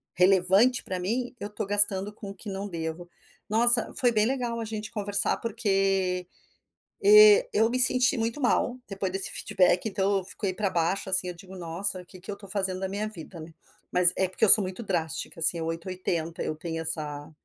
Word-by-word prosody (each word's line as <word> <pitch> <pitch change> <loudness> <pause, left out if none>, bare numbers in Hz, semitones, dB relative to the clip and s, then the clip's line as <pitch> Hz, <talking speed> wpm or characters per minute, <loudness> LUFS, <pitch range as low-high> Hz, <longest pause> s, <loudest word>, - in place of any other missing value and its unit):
relevante 190 +6 +2
pra 185 -1 -5
mim, 240 +7 -4
eu 205 - -6
estou 210 -1 -6
gastando 205 -1 +2
com 205 -1 -10
o - - -10
que 205 +2 -10
não 195 +1 -6
devo. 165 0 -7 0.4
Nossa, 235 +2 +5
foi 245 -2 +2
bem 215 -1 +2
legal 240 -2 -3
a 225 - -5
gente 215 -1 -6
conversar, 205 -1 +1
porque, 195 -5 -2 0.8
eh, 425 +4 +6
eu 225 - +2
me 250 +2 -2
senti 250 +1 +4
muito 230 +4 -3
mal. 245 -1 -1
Depois 195 -2 -5
desse 195 0 0
feedback, 180 +2 0
então, 195 0 -1
eu - - -9
fiquei 195 0 -5
pra 200 0 -2
baixo, 180 +3 -2
assim, 185 -1 +5
eu - - -6
digo: 190 +2 -14
“Nossa, 180 +3 +1
o - - -18
que 185 +1 -15
que 190 - -14
eu 200 - -4
estou 200 -1 -15
fazendo 190 -2 -2
da 190 - -3
minha 205 +2 -4
vida, 170 -3 -11
né?” 160 +1 -11 0.4
Mas 180 0 +6
é 190 - 0
porque 205 +4 0
eu - - +2
sou 215 - +8
muito 185 +5 -7
drástica, 165 -3 -3
assim, 165 +1 +4
é 165 - -5
8, 165 +2 -6
80 170 -3 -4
eu 155 - -4
tenho 165 +1 -6
essa 150 -2 -1
195 Hz, 210 wpm, -25 LUFS, 180-220 Hz, 0.8 s, sou